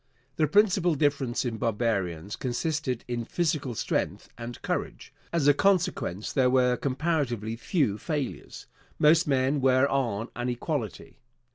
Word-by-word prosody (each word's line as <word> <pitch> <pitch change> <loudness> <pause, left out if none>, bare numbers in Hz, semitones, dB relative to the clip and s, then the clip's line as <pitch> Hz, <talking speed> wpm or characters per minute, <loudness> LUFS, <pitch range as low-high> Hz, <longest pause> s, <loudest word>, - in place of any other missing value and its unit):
The 155 - +3
principal 185 -2 +3
difference 140 -4 0
in 115 -2 -2
barbarians 105 -6 -1
consisted 130 0 -2
in 120 -1 -2
physical 150 -4 -1
strength - - -2
and 120 +1 -7
courage. - - -4 0.2
As 165 -4 +1
a 145 - +7
consequence, 180 - 0
there 130 -2 +3
were 125 -1 +3
comparatively 130 -6 -1
few 115 - 0
failures. 150 -5 -4 0.3
Most 160 +3 +5
men 135 +1 +1
were 130 +1 +4
on 115 -5 -1
an 120 +1 -2
equality. 120 - -4
130 Hz, 130 wpm, -27 LUFS, 120-150 Hz, 0.3 s, a